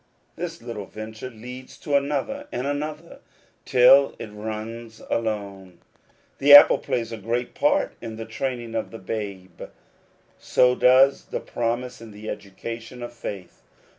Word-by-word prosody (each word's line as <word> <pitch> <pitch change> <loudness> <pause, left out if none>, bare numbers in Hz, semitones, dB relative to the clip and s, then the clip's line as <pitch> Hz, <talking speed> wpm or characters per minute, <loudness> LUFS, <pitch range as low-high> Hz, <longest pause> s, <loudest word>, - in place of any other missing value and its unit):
This 170 -4 -6
little 115 -4 -6
venture 110 +3 -8
leads 125 +2 -10
to 145 - -5
another 150 - -1
and 125 - -3
another, 150 +3 -4 0.5
till 135 +2 +6
it 110 - -7
runs 110 +2 -7
alone. 100 -5 -3 0.6
The 145 +1 +9
apple 145 - +9
plays 115 -2 -2
a 115 - -5
great 120 +4 -3
part 290 0 +1
in 115 -2 -6
the 115 0 -6
training 120 -3 -4
of 110 -1 -2
the 115 - -9
babe, 95 -3 -6
and - - -7 0.7
so 125 0 +3
does 130 +2 +5
the - - -4
promise 120 +1 -3
in 115 - -10
the 105 +1 -7
education 115 +5 -8
of 120 - -7
faith. 100 -6 -8
115 Hz, 145 wpm, -24 LUFS, 110-130 Hz, 0.7 s, The